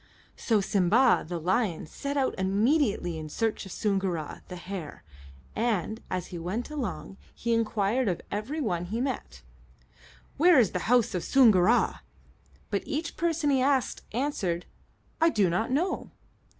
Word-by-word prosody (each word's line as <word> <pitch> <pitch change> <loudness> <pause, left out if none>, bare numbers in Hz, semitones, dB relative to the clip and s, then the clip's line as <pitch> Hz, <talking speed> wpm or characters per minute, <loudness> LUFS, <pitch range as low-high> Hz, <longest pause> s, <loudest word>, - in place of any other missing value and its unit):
So 220 -4 +1
Simba, 205 +6 +3
the 175 0 -3
lion, 185 +1 0
set 280 - -4
out 270 -2 +1
immediately 200 - +1
in 155 -1 -7
search 220 +3 -2
of - - -10
Soongoora, 190 -7 -2
the 180 - -7
hare, 180 -2 -7 0.5
and 220 -2 -1
as 180 -2 -2
he 175 - -4
went 200 - -4
along 235 -8 -5 0.2
he 235 0 -1
inquired 230 +1 +1
of 180 -4 0
every 215 +10 -3
one 180 - -1
he 215 +6 -3
met, 245 - -4 0.9
"Where 345 +1 +6
is 230 -7 +4
the 180 +3 -3
house 245 -2 +3
of 180 - -2
Soongoora?" 230 -4 +4 0.7
But 200 - 0
each 315 +3 -3
person 330 -3 0
he 265 -2 +3
asked 265 -1 +1
answered, 210 -9 -1 0.6
"I 330 - +6
do 200 - +2
not 180 +6 0
know." 325 +9 -1
215 Hz, 150 wpm, -28 LUFS, 180-260 Hz, 0.9 s, Where